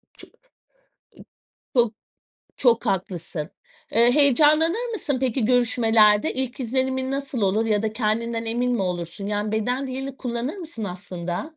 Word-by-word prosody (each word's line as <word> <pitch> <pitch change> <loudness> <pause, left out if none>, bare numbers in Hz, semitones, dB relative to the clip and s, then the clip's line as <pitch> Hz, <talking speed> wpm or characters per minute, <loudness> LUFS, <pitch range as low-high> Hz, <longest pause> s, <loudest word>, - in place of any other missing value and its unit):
I - - -17 1.5
Çok 240 -3 +3 0.6
çok 240 -2 +3
haklısın. 175 -4 -3 0.4
Eee, 235 +2 +5
heyecanlanır 305 - +4
mısın 325 -10 -1
peki, 255 -2 0
görüşmelerde? 225 -1 +3
İlk 260 0 -3
izlenimin 260 +1 -1
nasıl 275 -2 -3
olur 205 +3 +1
ya 210 -2 +1
da 220 -1 -2
kendinden 230 +1 -1
emin 245 +2 0
mi 235 - 0
olursun? 175 +1 -4
Yani, 210 +1 -2
beden 245 +5 -1
dilini 265 +1 -5
kullanır 245 +7 -3
mısın 320 - -7
aslında? 180 - -5
235 Hz, 130 wpm, -23 LUFS, 210-265 Hz, 1.5 s, Eee